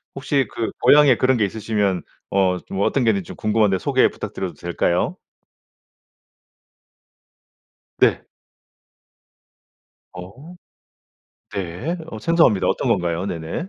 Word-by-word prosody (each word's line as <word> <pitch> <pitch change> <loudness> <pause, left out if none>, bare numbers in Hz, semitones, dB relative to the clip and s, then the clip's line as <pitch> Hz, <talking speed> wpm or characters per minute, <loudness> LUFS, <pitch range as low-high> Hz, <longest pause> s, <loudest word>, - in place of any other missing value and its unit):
혹시 135 -1 0
그 115 - -3
고향에 145 -4 +6
그런 130 +1 +2
게 110 - +1
있으시면 100 -4 -1 0.3
어 95 -2 +2
좀 95 - -4
어떤 130 +5 +1
게 115 - +3
있는지 100 -4 -3
좀 - - -8
궁금한데 105 -3 +1
소개 - - +3
부탁드려도 90 -3 -6
될까요? 85 +2 -1 2.8
네. - - +3 1.9
어. 105 - -11 1.0
네. 95 - -4
어 110 - -8
생소합니다. 165 - +3
어떤 - - -1
건가요? 85 +1 0
네네. 85 - -5
100 Hz, 230 characters per minute, -21 LUFS, 90-130 Hz, 2.8 s, 고향에